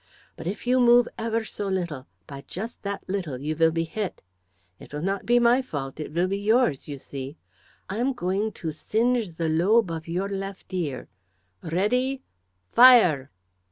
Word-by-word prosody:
But, - - -7
if 200 +6 -4
you 250 +1 +3
move 240 0 +6
ever 225 0 -1
so 205 -2 -5
little, 170 -8 -3 0.2
by 140 -1 -9
just 220 +6 -7
that 200 0 -4
little 180 -9 -3
you 150 +3 -3
will 165 +1 +4
be 165 +1 -1
hit. 195 +4 -5 0.6
It - - -13
will 150 +1 -5
not 195 +1 -2
be 240 +1 +5
my 240 +2 +4
fault, 145 - -6
it 155 - -5
will 170 +3 +1
be 195 +1 -2
yours, 220 - +2
you 145 -2 -5
see. 135 +2 -8 0.5
I 195 - -4
am 265 +3 +1
going 200 0 -1
to 160 - -4
singe 220 +3 0
the 165 0 -1
lobe 180 +5 +3
of 160 0 -5
your 180 +4 -1
left 195 -1 -6
ear. 155 -8 -3 0.5
Ready! 250 +10 0 0.5
Fire!" 220 - +7
190 Hz, 175 wpm, -25 LUFS, 160-230 Hz, 0.6 s, Fire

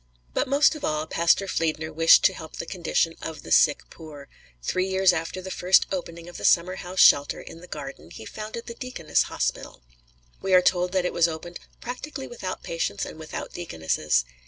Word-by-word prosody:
But - - 0
most 280 +3 +4
of 305 - -9
all 155 0 -1
Pastor 170 +4 +2
Fliedner 160 -3 -2
wished 165 +1 +6
to 190 - +5
help 160 -3 -10
the - - -5
condition 170 -2 0
of 155 -2 -7
the - - -10
sick 150 -2 +4
poor; 150 -4 -11 0.3
three 185 - 0
years 190 -1 +3
after 165 +2 -4
the 190 - -6
first 180 +1 +4
opening 170 -2 -5
of 175 - -9
the - - -9
summerhouse 185 +1 +1
shelter 145 0 +5
in 165 - -11
the 180 - -12
garden 135 - -8
he 110 - -10
founded 215 - -7
the 235 - -7
Deaconess 240 -9 -1
Hospital. - - -3 0.6
We 190 -1 +3
are 180 - +7
told 180 0 +2
that 185 -2 +1
it - - -1
was 170 -1 +4
opened 170 +2 -7 0.2
"practically 265 +3 -6
without 190 -6 -6
patients 165 0 -2
and 160 - -10
without 155 - -7
deaconesses." 80 - -1
175 Hz, 190 wpm, -25 LUFS, 160-190 Hz, 0.6 s, are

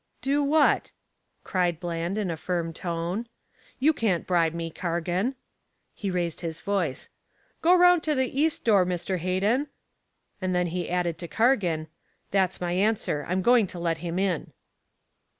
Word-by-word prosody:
"Do 280 +2 +2
what?" 290 +1 +3 0.5
cried 175 -4 0
Bland 170 +2 -3
in 200 -5 -1
a - - -2
firm 165 0 -2
tone. 175 +6 -3 0.5
"You 300 +5 +3
can't 205 - 0
bribe 170 -3 +2
me, 165 -1 -4
Cargan." 175 +9 -1 0.6
He 200 - -4
raised 175 -3 -2
his 165 -2 -4
voice. 185 -10 -2 0.5
"Go 350 +2 +6
round 355 -1 +6
to 305 -1 +1
the 260 +1 0
east 320 0 +1
door, 205 -5 +5
Mr. 180 +1 -2
Hayden." 200 - +1 0.7
Then 185 -2 0
he 175 +1 -3
added, 175 -2 -1
to 170 - -6
Cargan: 190 -9 +2 0.5
"That's 190 -2 +1
my 175 -1 -2
answer. 190 -6 0
I'm 185 +1 0
going 240 -2 +5
to 180 - -8
let 165 -1 -1
him 170 +1 -4
in." 190 -4 -1
180 Hz, 150 wpm, -26 LUFS, 170-225 Hz, 0.7 s, Go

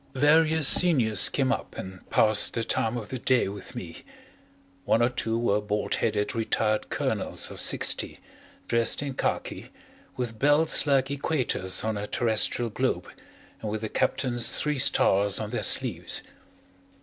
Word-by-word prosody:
Various 155 +2 +3
seniors 125 - +4
came 135 -2 0
up - - -4
and 95 0 -9
passed 110 -1 +3
the 115 - -1
time 115 +1 -2
of 110 -3 -7
the 130 - -5
day 125 -2 +1
with 100 +1 -9
me - - -8 0.9
one 115 - +2
or 120 +1 +3
two 115 -2 -2
were 105 -3 0
bald 105 0 -3
headed 105 -2 -1
retired 110 -1 -1
colonels - - -2
of - - -6
sixty, - - +1 0.5
dressed 115 +4 +1
in 140 -2 -4
khaki, - - -4 0.5
with 115 -3 -5
belts 150 +2 +4
like 135 -1 +2
equators 130 - -1
on 110 -1 -2
a 105 0 -5
terrestrial 115 +1 0
globe - - -2 0.5
and 110 - -4
with 110 +1 -4
a 110 - -3
captain's 120 0 0
three 150 -2 -2
stars 100 -7 +2
on 110 -1 -5
their - - -2
sleeves. - - +1
115 Hz, 150 wpm, -26 LUFS, 105-135 Hz, 0.9 s, seniors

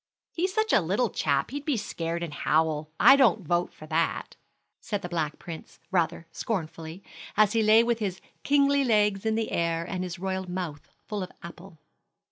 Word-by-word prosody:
"He's 370 +3 0
such 435 +1 +1
a - - +6
little 195 +6 0
chap 140 - 0
he'd 285 +1 -4
be 290 -4 0
scared 170 -4 -3
and 165 -3 -5
howl. 155 0 +1
I 270 - +9
don't 225 - +3
vote 175 +1 +1
for 155 - -12
that," 160 +2 -1 0.4
said 205 -2 -4
the 175 - -4
Black 160 -4 -2
Prince, 165 -2 -9
rather 170 -2 0
scornfully, 165 -3 -4 0.3
as 210 -1 +5
he 225 - +3
lay 220 +1 +6
with 235 -1 0
his 190 -4 -3 0.2
kingly 280 0 +3
legs 210 -3 +2
in 220 - +1
the 225 0 -1
air, 170 0 0
and 185 -1 -3
his 180 -1 -5
royal 190 0 -3
mouth 175 -5 -5 0.2
full 210 -2 -4
of 185 - -5
apple. 170 +1 -11
185 Hz, 185 wpm, -27 LUFS, 165-220 Hz, 0.4 s, I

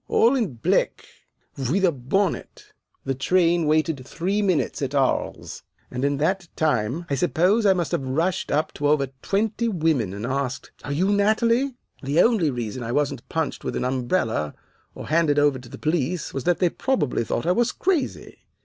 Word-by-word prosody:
'All 240 +4 +4
in 220 - -1
black, 115 - 0 0.6
with 190 +6 +2
a 175 - +4
bonnet!' 165 +8 -2 0.3
"The 135 - 0
train 170 +4 +2
waited 155 -2 +1
three 185 +9 -1
minutes 185 -8 0
at 135 0 -2
Aries, 135 -2 -1 0.3
and 125 +1 -3
in 140 0 +1
that 175 +5 0
time 145 +1 0
I 140 - -2
suppose 180 - +2
I 195 - +6
must 175 -3 -2
have - - 0
rushed 160 +7 -1
up 150 +2 +1
to 145 - -1
over 145 -3 +2
twenty 220 +3 0
women 160 - +1
and 105 +3 -5
asked, 130 -1 -3
'Are 145 - -5
you 180 +8 +1
Natalie?' 230 +6 +2 0.3
The 140 +4 0
only 210 -7 +4
reason 120 -2 -4
I 115 0 -4
wasn't 145 +2 -1
punched 160 -3 -2
with - - -3
an - - -1
umbrella 125 - -1 0.4
or - - -8
handed 155 -2 +3
over 145 -2 +3
to 125 -1 -13
the - - -9
police 160 +2 -1
was 135 - -4
that 175 -1 +3
they 180 - +2
probably 195 - 0
thought 120 - -2
I 175 - +3
was 240 +6 +2
crazy. 355 -7 -2
155 Hz, 180 wpm, -24 LUFS, 135-190 Hz, 0.6 s, I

